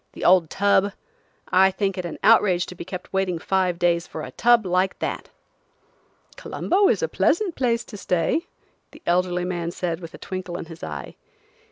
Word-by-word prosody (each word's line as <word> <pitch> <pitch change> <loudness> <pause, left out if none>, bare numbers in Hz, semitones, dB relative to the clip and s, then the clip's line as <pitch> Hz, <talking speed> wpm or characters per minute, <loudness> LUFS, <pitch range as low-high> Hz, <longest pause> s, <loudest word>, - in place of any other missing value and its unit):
"The - - -6
old 180 -3 +5
tub! 200 0 +2 0.6
I 190 +1 +5
think 195 0 -1
it 185 - -4
an 170 - -5
outrage 190 -6 +5
to - - -9
be - - -8
kept 185 +1 -8
waiting 190 -2 0
five 185 0 0
days 170 -1 +1
for 155 - -7
a 130 - -7
tub 235 - +3
like 185 +1 +1
that." - - -4 1.1
"Colombo 390 +2 +1
is 475 - +1
a - - +2
pleasant 385 -4 +1
place 235 -4 0
to 210 - -10
stay," 180 - 0 0.4
the - - -17
elderly 180 0 +1
man 175 -2 -2
said 170 -1 -3
with 165 -1 -9
a - - -10
twinkle 185 -2 -5
in - - -6
his 165 0 -12
eye. - - -7
185 Hz, 185 wpm, -23 LUFS, 175-200 Hz, 1.1 s, old